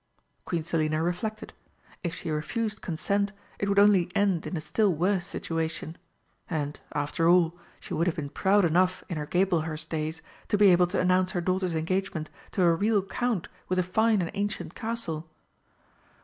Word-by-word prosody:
Queen 170 -3 -1
Selina 155 -1 0
reflected. 215 +5 -3 0.5
If 170 -2 -2
she 160 - -5
refused 215 +8 -2
consent, 200 +4 -1 0.3
it 200 - 0
would 200 - +1
only 200 -4 +5
end 200 -5 +2
in 180 - -3
a - - -1
still 205 +6 +1
worse 180 +3 0
situation. 160 -2 -3 0.5
And, 150 -3 -2
after 150 +3 +1
all, 175 -1 +4 0.2
she - - -8
would 170 +3 +1
have 170 - +1
been 140 -2 -5
proud 195 +2 +3
enough 180 +3 +2
in 170 - -3
her 150 -1 -4
Gablehurst 165 -4 0
days 160 0 -3 0.2
to 210 - +2
be 200 -2 +7
able 180 0 +5
to 185 +2 -1
announce 185 0 +2
her 175 - 0
daughter's 185 -1 0
engagement 165 -1 -2 0.2
to 185 - +2
a 170 -1 +5
real 205 +3 +2
Count 220 -1 -1 0.2
with 185 - +1
a 185 - +3
fine 215 +2 +2
and 165 - -4
ancient 205 +1 -3
castle. 175 -9 -3
180 Hz, 175 wpm, -28 LUFS, 160-200 Hz, 0.5 s, be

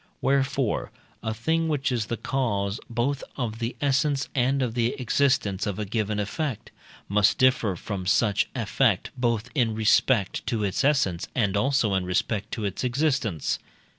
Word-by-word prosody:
Wherefore, 135 -3 0 0.3
a 110 - -2
thing 160 +9 0
which 145 -4 0
is 115 -4 -1
the 115 - -2
cause 105 -7 -1
both 120 +4 -1
of 115 -4 -3
the 115 +1 -3
essence 140 0 +1
and 135 +1 +2
of 120 -3 -2
the 120 0 +1
existence 125 -6 +1
of 100 -2 -2
a 105 - -2
given 105 0 -1
effect, 120 +4 -3 0.4
must 105 0 +3
differ 125 -7 +3
from 95 +1 -5
such 100 +2 +2
effect - - +1
both 120 -1 -1
in 120 -7 +1
respect 110 -1 +2
to 110 -3 0
its 100 +6 0
essence, 130 - +1
and 105 -6 +1
also 120 -2 +2
in 95 -1 +1
respect 100 +4 -1
to 110 - -3
its 100 +4 -3
existence. 125 - 0
115 Hz, 160 wpm, -26 LUFS, 105-135 Hz, 0.4 s, must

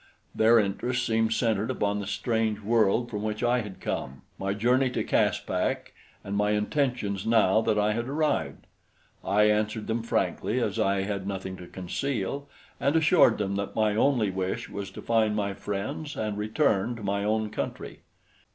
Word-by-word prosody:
Their 115 +2 +5
interest 120 +4 0
seemed 110 -1 +1
centered 110 -1 +1
upon 105 -5 0
the 100 - -5
strange 110 0 0
world 115 +2 +2
from 105 -2 -3
which 110 +1 -3
I 120 +1 +3
had 105 -4 -9
come, 65 +1 -4 0.2
my 100 +1 -1
journey 125 +5 +2
to 125 - -2
Caspak - - 0 0.3
and 100 - -4
my 105 +1 +2
intentions 105 -3 -1
now 110 -2 +4
that 110 -1 +1
I 105 +1 +2
had 115 +2 -3
arrived. 155 +2 -1 0.6
I 100 +2 +3
answered 105 +1 +1
them 115 +1 -1
frankly 115 +2 -1
as 110 -2 -1
I 100 -2 +2
had 100 -1 -3
nothing 95 -1 -4
to 90 - -10
conceal 130 +8 -3 0.3
and 140 +3 +1
assured 160 +2 +5
them 100 -1 -1
that 100 0 -4
my 110 -1 +2
only 115 -4 +2
wish 95 0 -3
was 100 -1 -5
to - - -10
find 110 -2 +2
my 100 -2 -1
friends 105 +10 -4
and 110 -1 -2
return 110 0 +1
to 115 - -9
my 100 0 -1
own 110 0 0
country. - - -5
105 Hz, 170 wpm, -27 LUFS, 100-115 Hz, 0.6 s, Their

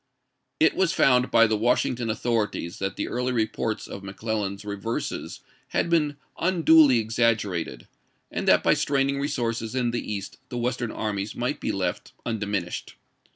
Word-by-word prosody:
It 160 - +4
was 185 -3 +2
found 125 -1 +4
by 115 - +6
the 110 -1 +1
Washington 120 +1 +1
authorities 110 -5 -1
that 95 0 -2
the - - -3
early 125 +1 -1
reports 110 -2 -1
of 100 - -8
McClellan's 100 0 -3
reverses 105 +3 -4 0.3
had 170 - -1
been 150 -4 +2 0.2
unduly 160 -6 +5
exaggerated, 110 - 0 0.4
and - - -3
that - - +5
by - - +5
straining 140 0 +1
resources 115 -5 -2
in 125 -2 +1
the 120 -2 -3
East 100 -2 -5
the 120 - -4
Western 120 0 -1
armies 105 -2 -3
might - - -2
be - - -1
left - - -3
un 115 -2 -2
diminished. 100 -4 -3
115 Hz, 155 wpm, -25 LUFS, 105-125 Hz, 0.4 s, by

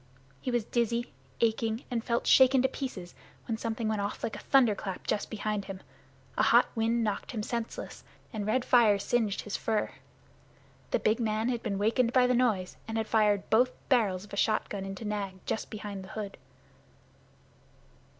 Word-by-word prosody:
He - - -3
was 240 -3 0
dizzy, 235 - -1 0.3
aching, 225 +1 +1
and 230 -2 -1
felt 235 -1 0
shaken 260 0 +6
to - - +5
pieces 250 -10 -6 0.3
when 225 - -1
something 225 -1 -2
went 215 -2 0
off 200 +1 -4
like 225 - -2
a - - -7
thunderclap 215 -8 +2
just 205 - -1
behind 210 -2 -2
him. 195 -1 -7 0.6
A - - +6
hot - - +6
wind 230 +1 +1
knocked 210 +2 -2
him 215 -3 -3
senseless 235 0 -5 0.3
and 210 -2 -3
red 245 +3 +1
fire 225 -5 +5
singed 210 0 0
his 210 - -5
fur. 220 -2 -1 1.0
The - - +2
big 215 +2 +1
man 220 0 0
had 240 -2 -1
been 205 -4 -2
wakened 230 +4 +2
by 255 -1 +5
the 250 - +3
noise, 220 -7 +1
and 225 0 -3
had 220 - 0
fired 210 -3 +2
both 245 +3 +5 0.2
barrels 205 -8 +2
of 210 - -14
a - - -4
shotgun 205 -2 0
into 195 +3 -6
Nag 205 -2 -3
just - - -2
behind 205 -2 -6
the - - -10
hood. 205 -2 -5
220 Hz, 180 wpm, -30 LUFS, 205-235 Hz, 1.0 s, shaken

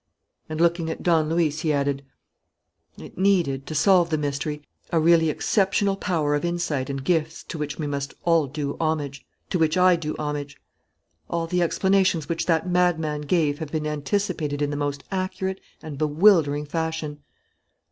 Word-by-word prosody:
And, 155 0 -4
looking 170 -1 +2
at 160 - -5
Don 160 -3 +3
Luis, 160 -2 +1
he 160 - 0
added: 140 -1 0 0.9
"It - - -11
needed, 175 -9 +2
to 155 - -5
solve 175 +2 +4
the 155 - +1
mystery, 150 +1 -3 0.3
a 165 - +2
really 165 0 +4
exceptional 195 +4 +1
power 165 -7 0
of 145 - 0
insight 170 -6 -1
and 135 -1 -4
gifts 160 0 0
to 165 - -7
which 150 -1 -3
we 155 - -3
must 140 -1 -4
all 165 -4 +3
do 145 +1 -4
homage, 150 -4 -2 0.3
to 180 - +1
which 160 +1 +2
I 180 0 +6
do 155 -2 -4
homage. 145 -1 -4 0.7
All 170 -1 -1
the 180 +2 0
explanations 185 -2 +2
which 165 +1 -2
that 165 0 +2
madman 170 -4 +1
gave 150 -1 +1
have 155 -3 -6
been 155 -1 -2
anticipated 150 0 -2
in 145 0 0
the - - -2
most 145 -1 -3
accurate 190 0 -3 0.2
and 150 -3 -7
bewildering 155 -2 +4
fashion." 160 -1 -3
160 Hz, 165 wpm, -24 LUFS, 145-175 Hz, 0.9 s, I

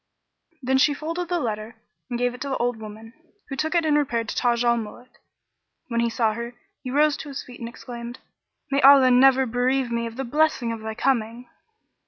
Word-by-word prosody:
Then 265 +1 +2
she 290 +1 +3
folded 335 +4 -4
the 350 -1 0
letter 220 -3 -4 0.3
and 240 - -2
gave 245 0 0
it 250 - -12
to 280 - -3
the 265 - -1
old 245 -1 -1
woman, 220 +1 -10 0.4
who 270 - -4
took 315 +4 -2
it 335 -2 +2
and 300 -1 +3
repaired 235 -7 0
to - - -4
Taj 240 -1 +1
al 235 0 +3
Muluk. 230 +2 -7
And - - -52
when 235 -1 -1
he 235 0 +2
saw 225 -1 +1
her, 235 +2 -6 0.3
he 255 - -6
rose 295 +2 +3
to 295 - -8
his 275 - -6
feet 250 -1 -13
and 230 - -5
exclaimed, 240 0 -8 0.5
"May 275 +1 +2
Allah 270 -2 +7
never 265 +1 +5
bereave 250 +1 0
me 235 0 -1
of 230 - -9
the 270 - -3
blessing 275 -2 +1
of 230 - -5
thy 220 0 -6
coming!" 240 -1 -1
245 Hz, 220 wpm, -24 LUFS, 235-275 Hz, 0.5 s, Allah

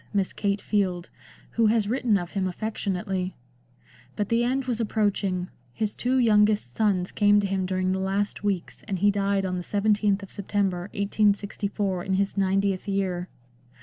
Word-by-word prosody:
Miss 195 -2 +1
Kate 200 -1 -1
Field, 185 -4 -1 0.4
who 230 -1 +3
has 215 -1 +2
written 235 -2 +2
of 175 -2 -5
him 190 -2 -1
affectionately. 190 -2 -3 0.8
But 205 -1 -2
the 230 +1 +2
end 260 +2 0
was 245 -3 -1
approaching; 200 -4 0 0.2
his 215 - -2
two 255 +2 0
youngest 210 - +3
sons 190 - +1
came 205 0 +4
to 205 - 0
him 190 -1 -1
during 185 0 0
the 190 - 0
last 195 +2 -1
weeks, 195 -4 -2
and 195 -3 -1
he 205 +3 +4
died 200 -1 0
on 185 -1 -2
the 180 - -4
17th 205 0 +1
of 195 - -10
September 195 -2 -1
1864 200 -2 0
in 190 - -2
his 200 +1 0
ninetieth 195 0 +1
year. 185 -3 -1
200 Hz, 165 wpm, -26 LUFS, 190-210 Hz, 0.8 s, came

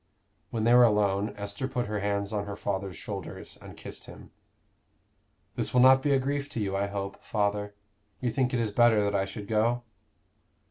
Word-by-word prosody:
When 110 -2 -2
they 120 +2 +5
were 125 0 +8
alone, 105 -2 +2
Esther 100 +5 -3
put 125 -2 -2
her 105 -1 -2
hands 100 +1 -1
on 100 -1 -2
her 100 - -4
father's 95 -3 -3
shoulders - - -7
and - - -11
kissed - - -7
him. - - -12 1.2
"This - - -2
will 125 - +6
not 130 +1 +7
be 145 - 0
a 135 - +5
grief 140 +2 -2
to - - -3
you, 100 -2 -1
I 100 +1 0
hope, 100 -1 -5
father? 105 -1 -1 0.4
You 125 -2 -1
think 130 -1 +1
it 125 - 0
is 110 -3 0
better 110 -1 +4
that 100 0 0
I 95 -1 +1
should 100 +1 -7
go?" 115 +2 +1
105 Hz, 195 wpm, -28 LUFS, 100-120 Hz, 1.2 s, were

